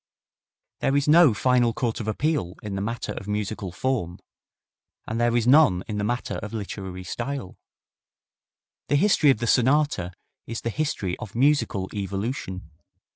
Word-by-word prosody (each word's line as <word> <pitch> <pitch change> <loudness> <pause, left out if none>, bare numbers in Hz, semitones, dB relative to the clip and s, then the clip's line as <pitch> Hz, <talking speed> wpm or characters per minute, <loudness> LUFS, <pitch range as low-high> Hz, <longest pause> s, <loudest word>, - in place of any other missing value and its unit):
There 135 - +1
is 140 - 0
no 160 -2 +7
final 125 +1 +2
court 115 -1 -2
of 110 - -5
appeal 120 - -1
in 105 -2 -5
the 95 - -2
matter 115 +1 -3
of 100 - -7
musical 105 -2 -3
form, 90 -4 -2 0.9
and 115 +1 -2
there 120 0 +3
is 115 - +1
none 130 - +5
in 105 -2 -3
the - - -1
matter 120 +4 -2
of 105 - -7
literary 95 -3 -6
style. 120 +3 -5 1.3
The 145 - +2
history 160 -2 +4
of 135 - +4
the 120 - -3
sonata 130 - +2 0.3
is 115 0 -5
the 115 - -2
history 110 - -2
of 105 - -8
musical 130 -7 +2
evolution. 95 - -4
115 Hz, 155 wpm, -25 LUFS, 100-135 Hz, 1.3 s, no